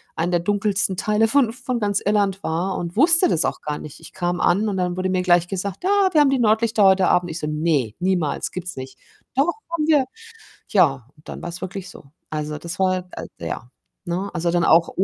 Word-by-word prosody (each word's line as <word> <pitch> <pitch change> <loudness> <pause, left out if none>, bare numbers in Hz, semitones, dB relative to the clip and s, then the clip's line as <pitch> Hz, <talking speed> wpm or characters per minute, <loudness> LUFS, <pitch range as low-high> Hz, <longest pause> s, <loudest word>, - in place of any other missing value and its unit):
einen 170 +2 -1
der 175 - +2
dunkelsten 200 0 0
Teile 215 +3 +2
von 245 -2 +2
von 250 0 -3
ganz 205 -2 0
Irland 200 -1 +1
war 175 +4 -1
und 170 0 -5
wusste 335 +6 +5
das 165 - +2
auch - - -3
gar 150 -1 -3
nicht. 150 - -10
Ich - - -13
kam 175 -1 -2
an 200 +5 +2
und 195 - -2
dann 180 -1 -1
wurde 185 0 -1
mir 185 -1 +1
gleich 175 -1 +3
gesagt: 195 - -4
„Ja, 395 0 +3
wir 315 - +3
haben 280 -2 +4
die 270 - +1
Nordlichter 220 -1 +2
heute 190 -1 +5
Abend.“ 180 0 +2
Ich 160 - -5
so: - - -4
„Ne, 150 -7 0
niemals, 180 -5 0
gibt's 180 -1 -6
nicht.“ 130 0 -8 0.4
„Doch, 285 +6 +2 0.2
haben 330 -3 0
wir.“ 295 -4 +4 0.6
Ja, 140 - +2
und 150 - -21
dann - - -7
war's 175 0 -6
wirklich 190 0 -6
so. - - -13 0.3
Also, 150 -1 -4
das 170 +3 -7
war, 185 -1 0
äh, - - -7 0.2
ja 110 +9 -5 0.3
ne? 185 +3 -3
Also, 170 0 -1
dann 175 -1 +2
auch. 165 +1 +4
185 Hz, 220 wpm, -22 LUFS, 170-210 Hz, 0.6 s, wusste